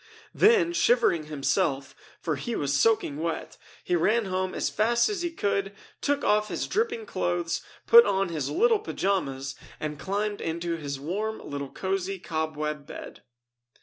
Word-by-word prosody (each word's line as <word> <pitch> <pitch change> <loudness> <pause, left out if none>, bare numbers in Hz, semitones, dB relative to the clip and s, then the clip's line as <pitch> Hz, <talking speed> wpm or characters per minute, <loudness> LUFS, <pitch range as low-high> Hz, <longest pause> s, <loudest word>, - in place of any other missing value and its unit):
Then, 410 -6 +4
shivering 240 - +3
himself, 140 -2 0 0.3
for 155 - -1
he 230 - -4
was 140 -1 -1
soaking 145 -2 +2
wet, 165 +1 -4 0.2
he 180 - +1
ran 215 +7 +2
home 185 0 -2
as - - 0
fast 235 - +2
as 405 -4 -2
he 345 - -1
could, 200 -10 -1 0.3
took 285 0 0
off 210 0 +3
his - - -2
dripping 450 +2 -1
clothes, 175 - -1 0.2
put 470 0 +9
on 195 -1 +1
his 155 -5 -2
little 450 +3 +3
pajamas, 140 - -2 0.3
and 150 -1 -4
climbed 205 +1 -2
into 170 +1 -2
his 140 -4 -5
warm 205 +9 -2
little 140 -1 -6
cozy 195 +2 -2
cobweb 155 -3 -3
bed. - - -9
185 Hz, 150 wpm, -27 LUFS, 155-230 Hz, 0.3 s, put